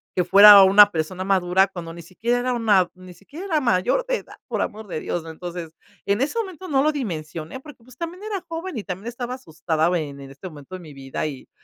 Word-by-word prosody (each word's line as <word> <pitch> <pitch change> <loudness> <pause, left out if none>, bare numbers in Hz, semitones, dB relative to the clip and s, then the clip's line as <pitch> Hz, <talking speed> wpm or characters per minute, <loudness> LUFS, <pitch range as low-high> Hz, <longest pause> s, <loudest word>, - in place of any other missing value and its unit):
que 180 - +2
fuera 200 +2 +9
una 205 +2 +7
persona 180 +3 -3
madura 190 0 +3
cuando 170 -3 -8
ni 170 - -10
siquiera 225 +8 -2
era 250 +1 -1
una 210 -6 +3
ni 185 0 -13
siquiera 295 - -10
era 315 -4 +1
mayor 240 - +1
de - - +1
edad, - - -13
por - - -2
amor 215 0 -5
de 155 - -5
Dios" 170 -2 -4
Entonces, 165 0 -8 0.3
en 200 +5 0
ese 305 +12 -1
momento 375 -4 -6
no 270 -2 +2
lo 305 0 +2
dimensioné 165 - -5
porque, 265 -5 -15
pues, 255 0 -18
también 345 +4 -6
era 400 -4 -5
joven 330 -2 -5
y 210 - -5
también 190 +4 -6
estaba 245 +1 -5
asustada 160 -8 -2
en 140 -2 -7
en 135 0 -11
este 165 +7 -10
momento 155 +2 -10
de - - -8
mi 155 -3 -12
vida 135 +2 -5
y 140 -4 -9
195 Hz, 225 wpm, -22 LUFS, 170-255 Hz, 0.3 s, fuera